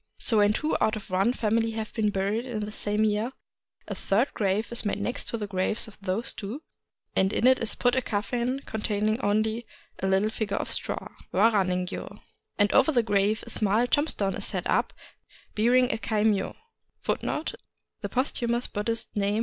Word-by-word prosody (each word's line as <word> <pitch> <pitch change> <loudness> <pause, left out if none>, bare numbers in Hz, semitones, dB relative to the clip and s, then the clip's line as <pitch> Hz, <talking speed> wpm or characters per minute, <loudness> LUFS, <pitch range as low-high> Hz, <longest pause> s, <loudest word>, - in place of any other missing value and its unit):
So 225 - +2
when 205 0 +5
two 305 +7 0
out 220 - +3
of 205 -3 -8
one 195 +5 +3
family 225 -1 +1
have 220 -1 -4
been 215 -2 +1
buried 200 +3 0
in 240 -4 -4
the 210 0 -4
same 210 0 0
year, 215 +4 +1 0.5
a - - -3
third 225 +8 +1
grave 205 +2 0
is 235 - +1
made 205 -1 -1
next 240 +4 -2
to 230 - -2
the 210 - -3
graves 195 +3 0
of 215 - -14
those 195 +4 -2
two, 230 +9 -6 0.5
and 190 +1 +3
in 225 - +1
it 260 0 +6
is 230 -3 -2
put 245 0 +2
a 260 - +2
coffin 245 +4 -1
containing 215 +1 -1
only 220 +3 0 0.3
a 190 - -1
little 195 +3 +2
figure 205 -3 -2
of - - -3
straw, - - -3
— - - -24
wara 220 -3 +5
ningyo; 180 0 -3 0.4
and 205 -1 +3
over 315 - +5
that 240 -5 +3
grave 205 0 +1
a 235 - -6
small 215 +3 +2
tombstone 245 -8 +1
is - - -4
set - - -1
up, - - +1 0.6
bearing 245 +3 +4
a - - -3
kaimyo. 210 -1 +1
215 Hz, 175 wpm, -27 LUFS, 205-235 Hz, 0.6 s, it